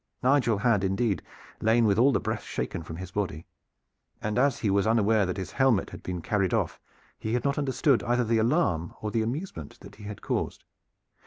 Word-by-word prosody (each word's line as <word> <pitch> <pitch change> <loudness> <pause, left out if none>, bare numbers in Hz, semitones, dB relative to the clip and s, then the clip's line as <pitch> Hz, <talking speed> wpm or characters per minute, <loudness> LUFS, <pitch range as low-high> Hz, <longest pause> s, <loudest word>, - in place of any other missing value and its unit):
Nigel 125 -4 +3
had 110 -3 +2
indeed 95 +1 0 0.4
lain 115 +1 +4
with 105 0 +3
all 135 +4 +6
the - - +2
breath - - -3
shaken 65 +6 -4
from 80 0 -8
his 95 +2 -7
body, 90 -6 -3 0.7
and 105 +3 -1
as 140 -1 +3
he 105 -4 +1
was 100 +1 +2
unaware 110 -2 +3
that 90 - -3
his 95 -3 -5
helmet 130 -7 +2
had - - -9
been 90 -2 -5
carried 100 -2 +1
off, - - -1 0.4
he 110 +2 -1
had 120 - -1
not 140 +1 0
understood 135 -1 +2
either 120 +1 +1
the 115 0 +1
alarm 110 - +1
or 105 - -3
the 115 - +1
amusement 115 - -5
that - - -13
he 105 - -11
had 105 0 -8
caused. - - -2
110 Hz, 200 wpm, -27 LUFS, 95-125 Hz, 0.7 s, all